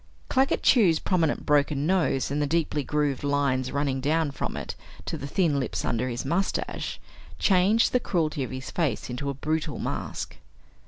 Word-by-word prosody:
Claggett 265 +1 +2
Chew's 195 - +5
prominent 165 -3 0
broken 145 -1 +2
nose, 165 -7 +1
and 145 +1 0
the 145 - +1
deeply 155 -1 0
grooved 145 -2 0
lines 140 -3 +1
running 140 -2 0
down 155 +1 +1
from 140 - -4
it - - -4 0.3
to - - -3
the 140 -3 -5
thin 150 -2 +1
lips 130 - -2
under 120 +2 0
his 120 +1 -4
mustache, 170 +8 -1 0.4
changed 200 +4 +4
the 250 - +3
cruelty 155 - 0
of 130 - -4
his 130 0 -6
face 140 -8 -1
into 140 +3 -3
a 140 - -3
brutal 155 +1 -2
mask. - - -4
145 Hz, 170 wpm, -26 LUFS, 140-165 Hz, 0.4 s, Chew's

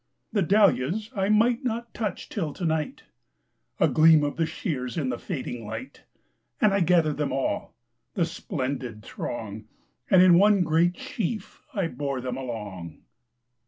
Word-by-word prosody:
The 205 - +2
dahlias 200 - +2
I 195 0 0
might 230 +4 +3
not 235 -1 -3
touch 215 -4 -3
till 160 -8 -3
to 180 - -5
night!A 155 - -4
gleam 155 -1 +6
of 145 - -1
the 165 -1 0
shears 135 - -4
in 140 -5 0
the 120 - -3
fading 125 -8 -5
light, 260 - -8 0.5
And 210 -2 +4
I 200 - +3
gathered 170 -4 +3
them 150 -1 -1
all,—the 120 - -3
splendid 130 -8 -4
throng, 110 -2 -6 0.4
And 185 -1 +7
in 175 -2 +7
one 205 -2 +5
great 170 +2 +2
sheaf 220 0 -4
I 195 -4 +1
bore 140 -4 -3
them 125 0 -4
along.. 105 -10 -7
160 Hz, 145 wpm, -26 LUFS, 125-195 Hz, 0.5 s, And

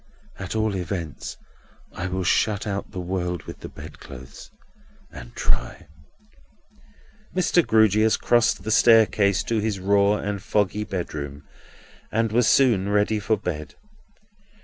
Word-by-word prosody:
At 95 +3 -5
all 110 -2 0
events, 85 -4 -5 0.6
I 85 - -4
will 95 0 -2
shut 100 +3 +1
out 100 -1 -3
the 95 - -7
world 90 -1 -3
with - - -10
the - - -8
bedclothes, 65 -1 -11 0.6
and - - -11
try." - - -2 1.5
Mr. 180 -1 +3
Grewgious 110 -1 +3
crossed 120 -1 +2
the 110 - -3
staircase 110 -4 +4
to 115 -1 -1
his 105 -2 -2
raw 100 +2 +3
and 100 -1 -4
foggy 105 0 0
bedroom, 75 -7 -5 0.7
and 115 0 0
was 120 0 +3
soon 110 -8 +3
ready 105 +1 +1
for 110 +1 0
bed. 80 -6 -5
100 Hz, 125 wpm, -24 LUFS, 90-110 Hz, 1.5 s, staircase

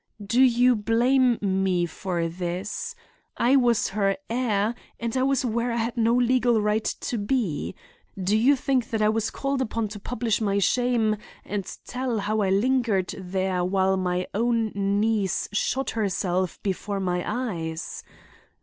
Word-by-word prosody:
"Do 235 +5 +2
you 250 -1 +5
blame 240 +3 +3
me 190 -3 +1
for 175 -1 -3
this? 185 - -4 0.4
I 250 +3 +4
was 240 -5 +3
her 195 -1 0
heir 225 -3 +1 0.3
and 235 0 -3
I 255 - +2
was 265 -1 +2
where 235 +1 0
I - - -1
had 230 0 -1
no 230 0 +3
legal 245 -1 +3
right 210 +1 0 0.2
to 235 - -2
be. 205 - -1 0.4
Do 190 +3 +1
you 250 +6 +5
think 260 -2 0
that 220 -4 0
I 210 - +4
was 225 0 0
called 275 -1 -2
upon 225 -3 -2
to 205 0 -8
publish 225 0 -1
my 200 -2 +1
shame 225 0 +2 0.3
and 205 -2 -3 0.2
tell 250 -2 -2
how 215 +2 0
I 195 - +1
lingered 215 -2 +1
there 185 -1 -1
while 190 +1 +2
my 180 -1 -1
own 230 0 +1
niece 200 0 0
shot 265 +6 0
herself 185 -4 -1
before 200 +1 -2
my 180 -2 -1
eyes? 170 -10 -4
215 Hz, 155 wpm, -25 LUFS, 195-245 Hz, 0.4 s, you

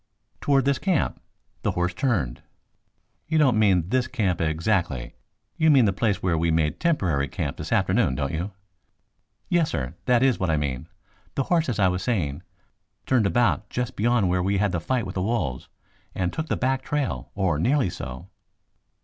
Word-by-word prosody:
"Toward 135 -2 +2
this 140 -1 +2
camp. 185 -6 0 0.4
The - - 0
horse 90 0 0
turned 90 - -1 0.4
" - - -47
"You 160 - +1
don't 130 -8 +4
mean 95 -5 +3
this 125 +1 +1
camp 100 -10 -1
exactly. 80 - 0 0.4
You 160 - +4
mean 135 -6 +6
the 100 - +2
place 100 -1 0
where 85 -3 +1
we 85 +1 +1
made 80 -1 +1
temporary 90 - +1
camp - - -4
this - - -6
afternoon, 65 - +2
don't 70 +2 -2
you?" 85 +5 -2 1.0
"Yes, 170 -3 +2
sir, 65 +1 -3
that 125 0 +3
is 135 -3 +3
what 95 - 0
I 80 - +2
mean. 70 0 -3 0.5
The 135 - +1
horse, 165 -3 +2
as 120 - -1
I 100 -3 +4
was 90 0 -1
saying, 85 - -1 0.6
turned 120 -6 +3
about 120 -2 +1
just 125 +1 -3
beyond 115 -2 +2
where 90 +1 +1
we 100 +2 +1
had 100 0 +1
the 90 - -1
fight 120 +6 -1
with 95 - -6
the 95 - -2
wolves, 90 - -2 0.5
and 90 -1 -1
took 160 0 -3
the - - -1
back 130 0 0
trail, 145 -1 -2
or 95 -7 +1
nearly 125 - +2
so." 65 0 -7
100 Hz, 185 wpm, -25 LUFS, 85-130 Hz, 1.0 s, mean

